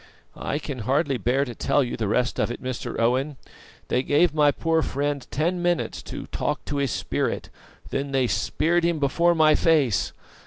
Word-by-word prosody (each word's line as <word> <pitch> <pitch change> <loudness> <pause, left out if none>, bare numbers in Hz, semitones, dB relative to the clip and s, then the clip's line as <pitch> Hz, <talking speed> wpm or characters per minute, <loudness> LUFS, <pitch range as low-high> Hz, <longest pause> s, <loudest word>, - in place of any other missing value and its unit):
"I - - -3
can 145 -4 -5
hardly 135 +3 0
bear 125 +6 +1
to 120 - -6
tell 140 +4 +1
the 115 -3 -3
rest 120 +4 0
of - - +1
it, 120 - -5
Mr. 130 -1 -4
Owen. 130 +5 +1 0.5
They 125 - +1
gave 145 +4 +3
my 150 -1 +4
poor 165 +2 +1
friend 145 -2 -2
ten 175 +4 0
minutes 175 -1 0
to - - -6
'talk - - -3
to 145 - -3
his 140 -1 +1
Spirit,' - - -2 0.4
then 140 +1 -2
they 135 -2 +2
speared 170 +7 +1
him 170 -1 +1
before 170 +5 +2
my 155 -1 +5
face. 150 - +2
140 Hz, 180 wpm, -24 LUFS, 130-160 Hz, 0.5 s, my